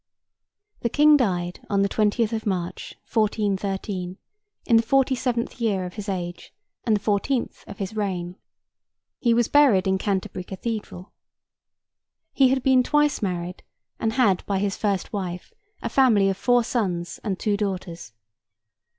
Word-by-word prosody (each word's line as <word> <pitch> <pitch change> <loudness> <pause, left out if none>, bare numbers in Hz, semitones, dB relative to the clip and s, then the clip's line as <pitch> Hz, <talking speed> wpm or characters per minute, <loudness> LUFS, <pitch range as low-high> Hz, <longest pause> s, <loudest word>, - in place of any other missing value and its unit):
The 235 - -1
King 300 +4 +6
died 180 -9 0
on 200 -1 +2
the - - +3
20th 215 +2 +1
of 220 -1 -3
March, 180 -2 -3
1413, 200 -3 -1 0.5
in 235 - +3
the 225 - +7
forty 270 +3 +2
seventh 245 -1 -2
year 200 -5 0
of 180 - -7
his 210 -1 -6
age, 175 -2 -5 0.3
and 220 -3 +3
the - - 0
fourteenth 210 +5 -1
of - - -9
his 195 +1 -5
reign. 180 -4 -2 0.8
He 235 -2 +3
was 235 -1 +2
buried 260 -10 +5
in 190 0 +1
Canterbury 190 -2 -2
Cathedral. 195 -1 -6 1.2
He 270 - +5
had 265 -1 +1
been 260 -1 +5
twice 295 +3 +2
married, 180 -2 -3 0.4
and 225 0 0
had, 220 -7 +2
by 200 - 0
his 195 0 -1
first 200 -1 -2
wife, 180 -3 -5 0.3
a - - -1
family 220 -8 +4
of 195 - 0
four 245 +2 +3
sons 180 -8 -2
and 195 -4 -2
two 210 +1 0
daughters. 185 - -4
205 Hz, 150 wpm, -24 LUFS, 185-235 Hz, 1.2 s, the